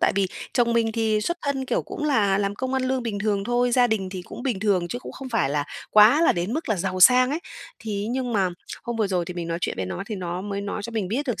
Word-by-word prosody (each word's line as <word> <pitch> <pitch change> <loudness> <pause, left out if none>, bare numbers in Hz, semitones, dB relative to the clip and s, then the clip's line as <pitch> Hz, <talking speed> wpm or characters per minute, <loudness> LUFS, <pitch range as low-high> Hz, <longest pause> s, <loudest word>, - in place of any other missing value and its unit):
tại - - +3
vì 195 -1 +3 0.3
chồng 235 -1 +2
mình 225 -1 +1
thì 220 -1 +1
xuất 345 +10 -1
thân 275 -2 -1
kiểu - - 0
cũng 300 - -6
là 205 -9 +3
làm 200 0 -1
công 260 +4 -3
ăn 260 - +1
lương 255 -1 0
bình 215 -4 -3
thường 200 -1 0
thôi, 245 +1 +1
gia 245 -1 +5
đình 205 -5 -1
thì 185 -2 -6
cũng 240 - -9
bình 235 -8 -1
thường 190 -5 +1
chứ 245 - -3
cũng - - -9
không 265 -1 -8
phải 225 - +1
là 145 0 0 0.3
quá 215 +10 +7
là - - +5
đến 175 +6 -2
mức 315 -2 -3
là 215 - +1
giàu 185 +1 -2
sang 255 +6 +7
ấy. 315 +4 -2 0.4
Thì 205 -2 -4
ấy 215 - -3
nhưng 250 -1 -2
mà 195 -3 +2 0.3
hôm 235 0 -4
vừa 215 -2 +1
rồi 180 -3 0
thì 180 - -7
mình 170 -1 -4
nói 165 0 -2
chuyện - - -2
với 95 - -3
nó 90 -1 -4
thì 215 - -4
nó 180 -1 -4
mới 200 -1 -3
nói 200 0 -4
cho 235 - -6
mình 210 -5 -2
biết 275 +7 -2
được 245 - -2
215 Hz, 300 wpm, -24 LUFS, 195-245 Hz, 0.4 s, quá